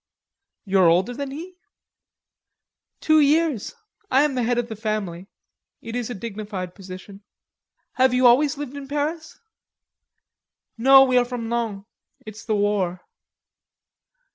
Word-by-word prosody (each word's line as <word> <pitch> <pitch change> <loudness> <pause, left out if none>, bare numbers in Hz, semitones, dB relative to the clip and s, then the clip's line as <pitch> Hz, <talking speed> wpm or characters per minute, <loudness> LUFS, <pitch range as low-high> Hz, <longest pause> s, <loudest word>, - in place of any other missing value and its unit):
"You 195 -1 +1
are 180 - +6
older 185 +8 +2
than 280 +2 -5
he?" 345 +6 -9 1.4
"Two 310 0 +4
years.... 300 - +1 0.3
I 265 +2 +4
am 295 -2 0
the 255 - -1
head 240 +1 0
of 240 -1 -1
the 220 - -7
family.... 200 -5 -4 0.5
It 230 +1 -8
is 245 -1 -3
a 245 - -5
dignified 205 -4 -6
position." 195 +1 -11 0.8
"Have 260 0 +4
you 250 0 +2
always 275 +4 +4
lived 285 -1 -6
in 280 -1 -8
Paris?" 305 +3 -4 1.4
"No, 270 +3 +7
we 255 -1 +3
are 245 - +1
from 240 -2 -5
Laon.... 220 -4 -3 0.4
It's 215 +1 -10
the 220 -2 -1
war." 200 -3 0
235 Hz, 140 wpm, -23 LUFS, 205-275 Hz, 1.4 s, No